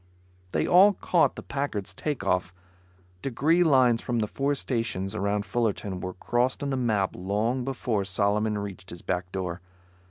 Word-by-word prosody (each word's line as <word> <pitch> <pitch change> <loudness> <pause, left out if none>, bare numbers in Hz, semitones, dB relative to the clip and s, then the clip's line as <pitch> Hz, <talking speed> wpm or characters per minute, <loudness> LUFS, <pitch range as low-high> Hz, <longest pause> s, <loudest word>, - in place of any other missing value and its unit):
They - - +1
all 195 +4 +7
caught 175 -2 +2
the - - -8
Packard's 105 -9 -3
takeoff. 90 - -1 0.7
Degree 155 +7 +2
lines 130 -7 +4
from 120 - -2
the 110 - +1
four 140 +6 -1
stations 115 -7 -2
around 100 0 -1
Fullerton 105 -5 -1
were 90 0 -5
crossed 125 +8 0
on 140 - -1
the - - 0
map 110 -7 +1
long 105 +7 -1
before 120 -5 -1
Solomon 105 +2 +1
reached 95 -2 -6
his 85 - -8
back 90 0 -2
door. 90 -2 -4
105 Hz, 155 wpm, -27 LUFS, 95-130 Hz, 0.7 s, all